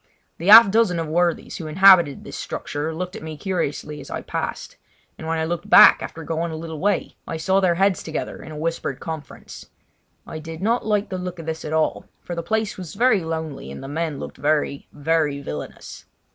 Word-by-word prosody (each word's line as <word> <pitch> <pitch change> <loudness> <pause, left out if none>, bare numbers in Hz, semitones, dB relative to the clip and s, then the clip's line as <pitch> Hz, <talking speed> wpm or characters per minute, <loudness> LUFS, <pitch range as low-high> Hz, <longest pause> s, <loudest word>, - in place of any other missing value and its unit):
The 170 - -4
half 220 0 +10
dozen 215 -5 +2
of 165 - -2
worthies 170 +2 0
who 160 - -6
inhabited 175 -3 +5
this - - -9
structure 145 +2 -4
looked 180 +3 -5
at - - -7
me 160 -1 -7
curiously 150 -5 -3
as - - -12
I - - -5
passed; - - -5 0.4
and 160 - -8
when 165 0 -1
I 160 - 0
looked 170 +1 -4
back - - +8
after 165 - -7
going 165 +1 -2
a - - -5
little 160 -1 -6
way 200 +2 -1
I 165 - -4
saw 190 +4 +2
their 180 -3 +2
heads 195 +1 +2
together 160 -1 -5
in - - -10
a 155 - -8
whispered 160 -4 -3
conference. 160 -3 -8 0.6
I 160 - -7
did 160 +1 -8
not 230 +6 +1
like 210 -1 0
the 185 - -4
look 180 0 -5
of 165 - -8
this 160 0 -4
at 150 - -5
all, 160 0 0
for 175 - -7
the 170 - -3
place 220 +3 -2
was 180 -1 -8
very 220 -4 +3
lonely, 160 - -5
and 70 - -8
the - - -7
men 155 0 -3
looked - - -8
very, 145 -1 0
very 150 -1 0
villainous. 75 - -8
165 Hz, 215 wpm, -22 LUFS, 155-185 Hz, 0.6 s, half